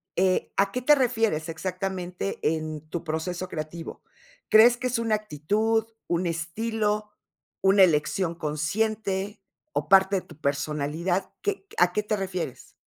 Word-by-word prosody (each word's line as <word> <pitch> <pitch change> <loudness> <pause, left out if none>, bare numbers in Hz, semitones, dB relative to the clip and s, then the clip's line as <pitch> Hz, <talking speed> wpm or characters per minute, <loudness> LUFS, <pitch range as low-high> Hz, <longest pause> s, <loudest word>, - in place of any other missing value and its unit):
eh, 185 0 +2
¿a 195 0 +3
qué 250 - -2
te 295 +4 +6
refieres 225 - +1
exactamente 185 +2 -3 0.2
en 155 -1 -5
tu 170 - -4
proceso 170 +3 -3
creativo? 160 +2 -6 0.5
¿Crees 235 +3 +7
que 255 +1 -2
es 245 -1 0
una 225 -2 +2
actitud, 215 +4 0 0.2
un 175 +1 0
estilo, 210 +5 -1 0.5
una 195 0 +6
elección 170 +1 +2
consciente, 195 +6 -1 0.3
o - - -1
parte 195 0 +6
de - - -2
tu - - -15
personalidad? 150 +5 -1
¿Qué 405 -1 -2
a 175 0 +5
qué 210 - 0
te 210 +1 0
refieres? 185 -8 -5
190 Hz, 140 wpm, -26 LUFS, 165-215 Hz, 0.5 s, Crees